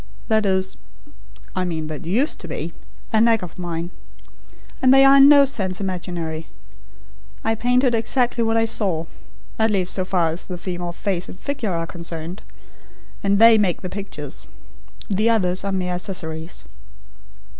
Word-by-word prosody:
That 220 Hz, -2 st, +2 dB
is 190 Hz, 0 st, 0 dB, 0.8 s
I 185 Hz, -, 0 dB
mean, 165 Hz, -3 st, -3 dB
that 155 Hz, +1 st, -7 dB
used 240 Hz, -, 0 dB
to 175 Hz, -, -7 dB
be 165 Hz, +1 st, -5 dB, 0.4 s
a 220 Hz, -, +4 dB
knack 230 Hz, -3 st, +3 dB
of 180 Hz, 0 st, -9 dB
mine. 170 Hz, -1 st, -4 dB, 0.9 s
And 255 Hz, -1 st, +5 dB
they 270 Hz, 0 st, +7 dB
are 275 Hz, +1 st, +7 dB
in 275 Hz, +1 st, +8 dB
no 285 Hz, -1 st, +8 dB
sense 190 Hz, -9 st, 0 dB
imaginary. 175 Hz, -4 st, -4 dB, 1.0 s
I 225 Hz, -, +1 dB
painted 245 Hz, +3 st, +2 dB
exactly 235 Hz, +1 st, +1 dB
what 225 Hz, 0 st, +1 dB
I 225 Hz, -, +3 dB
saw 190 Hz, -7 st, 0 dB, 0.5 s
at 220 Hz, 0 st, +3 dB
least, 185 Hz, -3 st, +1 dB
so 185 Hz, -, 0 dB
far 180 Hz, -3 st, +1 dB
as 165 Hz, -, -3 dB
the 180 Hz, -, -5 dB
female 175 Hz, -1 st, -4 dB
face 180 Hz, 0 st, -3 dB
and -, -, -10 dB
figure 265 Hz, -8 st, -3 dB
are 165 Hz, 0 st, -2 dB
concerned. 170 Hz, +2 st, -6 dB, 0.8 s
And 200 Hz, 0 st, +2 dB
they 225 Hz, 0 st, +7 dB
make 190 Hz, -4 st, 0 dB
the 185 Hz, -, -4 dB
pictures. 200 Hz, +1 st, -6 dB, 0.6 s
The 215 Hz, +2 st, +1 dB
others 185 Hz, -5 st, +2 dB
are 200 Hz, -, -2 dB
mere 180 Hz, -1 st, -1 dB
accessories." 165 Hz, -, -3 dB
190 Hz, 160 wpm, -21 LUFS, 175-225 Hz, 1.0 s, in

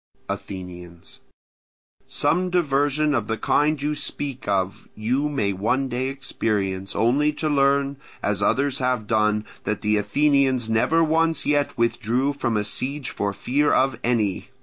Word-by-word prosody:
Athenians. 90 Hz, -3 st, -8 dB, 0.9 s
Some 180 Hz, +2 st, 0 dB
diversion 150 Hz, -3 st, +1 dB
of 115 Hz, -5 st, 0 dB
the 110 Hz, -, -1 dB
kind 150 Hz, +5 st, +2 dB
you 150 Hz, +2 st, -1 dB
speak 140 Hz, -3 st, -5 dB
of 95 Hz, -1 st, -1 dB
you 130 Hz, +7 st, 0 dB
may 105 Hz, -9 st, 0 dB
one 125 Hz, +8 st, 0 dB
day 125 Hz, +1 st, -1 dB
experience, 100 Hz, -8 st, -2 dB
only 140 Hz, +6 st, +3 dB
to 155 Hz, +1 st, -2 dB
learn, 140 Hz, -1 st, +2 dB, 0.3 s
as 100 Hz, -1 st, 0 dB
others 140 Hz, +6 st, +1 dB
have 125 Hz, -4 st, 0 dB
done, 105 Hz, -1 st, +1 dB, 0.2 s
that 105 Hz, -1 st, -2 dB
the 105 Hz, 0 st, +2 dB
Athenians 135 Hz, 0 st, +2 dB
never 120 Hz, +9 st, +3 dB
once 165 Hz, +1 st, +1 dB
yet 145 Hz, -2 st, +1 dB
withdrew 120 Hz, +3 st, +1 dB
from 120 Hz, -5 st, -1 dB
a 105 Hz, -, 0 dB
siege 130 Hz, +6 st, -3 dB
for 100 Hz, 0 st, -2 dB
fear 140 Hz, +8 st, +1 dB
of 130 Hz, -3 st, +2 dB
any. 110 Hz, -5 st, 0 dB
130 Hz, 145 wpm, -23 LUFS, 105-145 Hz, 0.9 s, only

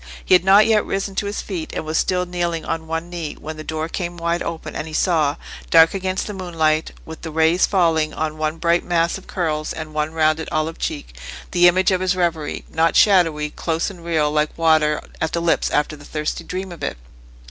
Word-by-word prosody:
He -, -, +3 dB
had 180 Hz, -, +6 dB
not 195 Hz, +3 st, +6 dB
yet 220 Hz, -2 st, +3 dB
risen 195 Hz, 0 st, -3 dB
to 200 Hz, +1 st, -2 dB
his 205 Hz, -, -4 dB
feet, 175 Hz, -6 st, -5 dB
and -, -, -3 dB
was 155 Hz, +1 st, -3 dB
still 180 Hz, +2 st, +1 dB
kneeling 175 Hz, -2 st, -2 dB
on 160 Hz, 0 st, -3 dB
one 165 Hz, +1 st, -3 dB
knee, 170 Hz, -3 st, -5 dB
when 155 Hz, +1 st, -7 dB
the 155 Hz, -, -7 dB
door 155 Hz, 0 st, -3 dB
came 175 Hz, 0 st, -4 dB
wide 170 Hz, 0 st, -1 dB
open 165 Hz, -1 st, -5 dB
and 155 Hz, -, -4 dB
he 155 Hz, -, -9 dB
saw, 155 Hz, -6 st, +2 dB, 0.3 s
dark 165 Hz, 0 st, +6 dB
against 190 Hz, -1 st, -2 dB
the 210 Hz, -, -5 dB
moonlight, 160 Hz, -4 st, 0 dB, 0.2 s
with 160 Hz, 0 st, -9 dB
the 165 Hz, -, -6 dB
rays 160 Hz, +3 st, +3 dB
falling 165 Hz, -5 st, +2 dB
on 155 Hz, 0 st, -3 dB
one 155 Hz, +1 st, -1 dB
bright 170 Hz, +1 st, +2 dB
mass 170 Hz, +1 st, 0 dB
of -, -, -19 dB
curls 155 Hz, -4 st, -2 dB
and 155 Hz, -1 st, -7 dB
one 150 Hz, 0 st, -1 dB
rounded 155 Hz, 0 st, +1 dB
olive 155 Hz, +1 st, -2 dB
cheek, -, -, -4 dB, 0.4 s
the 175 Hz, -1 st, +6 dB
image 185 Hz, +2 st, +3 dB
of 185 Hz, -1 st, +1 dB
his 185 Hz, 0 st, +1 dB
reverie—not 165 Hz, -1 st, -1 dB
shadowy—close 165 Hz, -2 st, +2 dB
and 175 Hz, -3 st, -13 dB
real 160 Hz, -3 st, +1 dB
like 150 Hz, 0 st, 0 dB
water 155 Hz, -2 st, +3 dB, 0.2 s
at 160 Hz, -, -1 dB
the 170 Hz, -, +1 dB
lips 170 Hz, -1 st, +1 dB
after 150 Hz, +1 st, 0 dB
the 145 Hz, -, -14 dB
thirsty 150 Hz, +1 st, -3 dB
dream 185 Hz, +1 st, -5 dB
of 170 Hz, -, -10 dB
it. -, -, -3 dB
165 Hz, 215 wpm, -21 LUFS, 155-180 Hz, 0.4 s, had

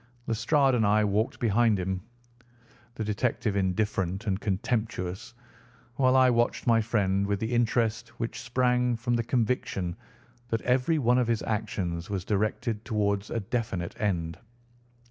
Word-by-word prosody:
Lestrade 135 Hz, +4 st, +2 dB
and 120 Hz, -3 st, +2 dB
I 105 Hz, +1 st, +4 dB
walked 105 Hz, +3 st, 0 dB
behind 115 Hz, -1 st, +3 dB
him, 95 Hz, 0 st, -2 dB, 0.9 s
the 110 Hz, -, -3 dB
detective 105 Hz, 0 st, -1 dB
indifferent 95 Hz, 0 st, -1 dB
and 95 Hz, -2 st, 0 dB
contemptuous, 100 Hz, -1 st, -2 dB, 0.6 s
while 130 Hz, -1 st, +4 dB
I 130 Hz, -1 st, +6 dB
watched 120 Hz, 0 st, +1 dB
my 115 Hz, -1 st, +4 dB
friend 100 Hz, -3 st, +1 dB
with 100 Hz, -1 st, 0 dB
the 110 Hz, +3 st, -2 dB
interest 115 Hz, -1 st, +1 dB
which 115 Hz, +1 st, -3 dB
sprang 125 Hz, 0 st, +1 dB
from 120 Hz, +1 st, -2 dB
the 120 Hz, -1 st, +1 dB
conviction 110 Hz, -7 st, -1 dB, 0.5 s
that 115 Hz, -2 st, -1 dB
every 130 Hz, +6 st, +2 dB
one 125 Hz, -3 st, +3 dB
of 125 Hz, -, +1 dB
his 115 Hz, -2 st, 0 dB
actions 95 Hz, -4 st, -3 dB
was 95 Hz, -3 st, -3 dB
directed 110 Hz, +1 st, -1 dB
towards 100 Hz, -3 st, -1 dB
a 115 Hz, -, -2 dB
definite 100 Hz, -5 st, -3 dB
end. 85 Hz, -5 st, -1 dB
110 Hz, 145 wpm, -28 LUFS, 100-120 Hz, 0.9 s, I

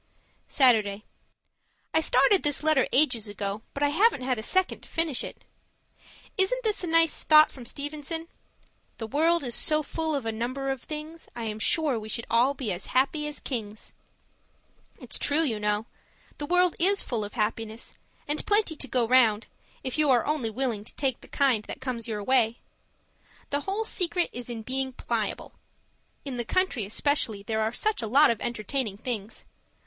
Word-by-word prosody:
Saturday 215 Hz, -6 st, +3 dB, 0.9 s
I -, -, +4 dB
started 315 Hz, +5 st, +4 dB
this 295 Hz, 0 st, +1 dB
letter 310 Hz, -4 st, +3 dB
ages 245 Hz, -6 st, +3 dB
ago, 205 Hz, 0 st, -4 dB
but 280 Hz, -, -1 dB
I 290 Hz, -, +4 dB
haven't 340 Hz, -, +3 dB
had 250 Hz, -2 st, 0 dB
a -, -, -3 dB
second 375 Hz, +10 st, 0 dB
to -, -, -15 dB
finish 325 Hz, -6 st, 0 dB
it. -, -, -9 dB, 1.0 s
Isn't -, -, +2 dB
this 430 Hz, -4 st, +1 dB
a -, -, -2 dB
nice 330 Hz, -1 st, +3 dB
thought 310 Hz, 0 st, +7 dB
from 250 Hz, -3 st, -11 dB
Stevenson? 295 Hz, +5 st, -5 dB, 0.7 s
The 225 Hz, -, -5 dB
world 320 Hz, +7 st, +2 dB
is 245 Hz, -2 st, -4 dB
so 305 Hz, +4 st, +1 dB
full 320 Hz, +1 st, -2 dB
of 275 Hz, -4 st, -3 dB
a 225 Hz, -, -1 dB
number 255 Hz, +5 st, -3 dB
of 270 Hz, -3 st, -4 dB
things, 310 Hz, +1 st, -8 dB
I 235 Hz, -, -5 dB
am 215 Hz, -1 st, -4 dB
sure 290 Hz, -1 st, +1 dB
we 215 Hz, 0 st, -9 dB
should 230 Hz, +1 st, -4 dB
all 250 Hz, +5 st, +3 dB
be 250 Hz, -7 st, -3 dB
as 175 Hz, +2 st, -5 dB
happy 300 Hz, +3 st, +1 dB
as 295 Hz, -, -6 dB
kings. 215 Hz, -5 st, -5 dB, 1.1 s
It's -, -, -3 dB
true, 295 Hz, +3 st, +2 dB
you 230 Hz, -8 st, -1 dB
know. 210 Hz, +1 st, 0 dB, 0.5 s
The 290 Hz, -, -4 dB
world 360 Hz, 0 st, +3 dB
is 395 Hz, +3 st, +5 dB
full 230 Hz, -4 st, -2 dB
of 205 Hz, -, -7 dB
happiness, 220 Hz, +1 st, -3 dB, 0.3 s
and 295 Hz, +1 st, -1 dB
plenty 415 Hz, -6 st, +3 dB
to 275 Hz, -, -4 dB
go 240 Hz, -2 st, +1 dB
round, 230 Hz, -3 st, +4 dB, 0.4 s
if 260 Hz, +3 st, -3 dB
you 300 Hz, -2 st, +3 dB
are 245 Hz, -3 st, +4 dB
only 295 Hz, -7 st, -1 dB
willing 230 Hz, -2 st, -2 dB
to -, -, -9 dB
take 265 Hz, -4 st, -1 dB
the -, -, -13 dB
kind 260 Hz, -7 st, +2 dB
that -, -, -7 dB
comes 250 Hz, -4 st, -4 dB
your 210 Hz, -2 st, -3 dB
way. 240 Hz, -1 st, +2 dB, 0.9 s
The 285 Hz, -, +1 dB
whole 425 Hz, +3 st, -1 dB
secret 360 Hz, -3 st, 0 dB
is 245 Hz, 0 st, -6 dB
in 230 Hz, -2 st, -5 dB
being 265 Hz, +2 st, -2 dB
PLIABLE. -, -, -3 dB, 0.7 s
In 265 Hz, -3 st, -4 dB
the 240 Hz, -, 0 dB
country, 325 Hz, -, 0 dB
especially, 220 Hz, -3 st, 0 dB
there 220 Hz, +1 st, -1 dB
are 220 Hz, +1 st, 0 dB
such 425 Hz, -, 0 dB
a 225 Hz, -, -3 dB
lot 275 Hz, +4 st, +6 dB
of 230 Hz, -, -4 dB
entertaining 230 Hz, -1 st, -2 dB
things. 220 Hz, -2 st, -5 dB
260 Hz, 185 wpm, -27 LUFS, 225-310 Hz, 1.1 s, thought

